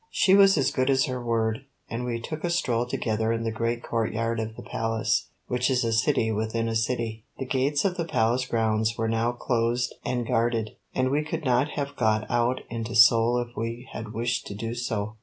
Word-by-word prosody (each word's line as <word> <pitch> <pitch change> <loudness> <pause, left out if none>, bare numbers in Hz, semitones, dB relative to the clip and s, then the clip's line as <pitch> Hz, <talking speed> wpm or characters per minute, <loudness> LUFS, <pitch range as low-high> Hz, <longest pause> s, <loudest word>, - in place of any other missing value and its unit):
She 190 - +3
was 195 -2 +7
as 135 -2 +2
good 130 +1 0
as 135 -1 +3
her 125 -2 -4
word, 115 +1 0 0.2
and 115 +2 -4
we 120 -1 -2
took 155 +6 -6
a 175 - 0
stroll 125 -9 0
together 110 -2 -1
in 115 0 -1
the 115 - -1
great 115 +1 -2
courtyard 115 0 -1
of 110 0 -4
the - - -9
Palace, 115 0 -1 0.2
which 125 +1 0
is 130 -2 +2
a 115 -1 0
city 110 0 +2
within 110 +1 -1
a 115 - -2
city. 110 -1 -1
The 130 - -4
gates 140 +4 +1
of 185 -1 0
the 170 - -1
Palace 125 -3 +1
grounds 110 -1 +1
were 115 - 0
now 115 +1 +1
closed 120 0 0
and 125 -1 -1
guarded, 115 -2 0 0.2
and 130 0 +1
we 150 +2 +1
could 155 +1 -4
not 130 +2 +3
have 140 0 -3
got 110 -3 +1
out 120 +1 +1
into 115 0 -5
Seoul 115 +1 +6
if 120 - -21
we 115 +2 -4
had 110 -1 -6
wished 120 +3 -2
to 100 - -6
do 115 +3 -4
so. 110 -3 -3
115 Hz, 215 wpm, -26 LUFS, 115-130 Hz, 0.2 s, was